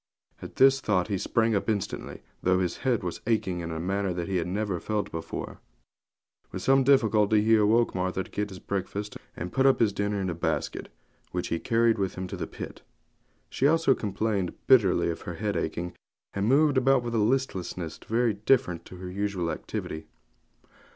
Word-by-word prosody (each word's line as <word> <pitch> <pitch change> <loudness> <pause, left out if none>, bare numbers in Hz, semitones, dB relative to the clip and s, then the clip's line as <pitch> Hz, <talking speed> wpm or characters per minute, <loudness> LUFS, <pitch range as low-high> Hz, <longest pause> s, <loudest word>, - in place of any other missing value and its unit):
At - - -9
this 135 0 +5
thought 95 -2 +1
he 100 - 0
sprang 115 +3 +1
up 100 +2 0
instantly, 105 -3 -3 0.2
though 90 0 +3
his 90 -2 -1
head 125 -6 0
was 90 -2 -4
aching 95 -6 0
in 85 -1 -4
a 80 - -4
manner 95 +1 -1
he 95 0 -1
had 85 0 -1
never 100 -1 -2
felt 105 +1 -2
before. 80 -1 -6 0.9
With 95 - -5
some 135 +2 +4
difficulty 110 -6 +4
he 110 +1 +5
awoke 110 +2 +3
Martha 95 +1 -1
to - - -17
get 105 0 -2
his 95 - -9
breakfast 100 +3 -4 0.2
and 90 +2 -5
put 135 0 +4
up 135 - +4
his 110 -3 +3
dinner 100 0 -1
in 95 - -1
a 90 - -1
basket 85 - -2 0.4
which 90 -1 -2
he 85 - -1
carried 115 +1 +2
with 95 -1 -1
him 95 - -4
to - - -5
the - - -4
pit. - - -8 0.7
She 135 - +1
also 165 -2 +4
complained 100 -4 -2
bitterly 95 -9 +4
of 80 - -7
her 90 -3 -6
head 105 +2 -2
aching, 85 +1 -3 0.4
and 100 +1 -1
moved 140 0 +4
about 135 -1 +3
with 120 -1 -4
a 115 - +2
listlessness 95 -8 -1
very 115 0 +2
different 100 -5 +1
to - - -11
her 90 0 -8
usual 95 -3 -2
activity. 80 0 -5
100 Hz, 190 wpm, -27 LUFS, 90-115 Hz, 0.9 s, this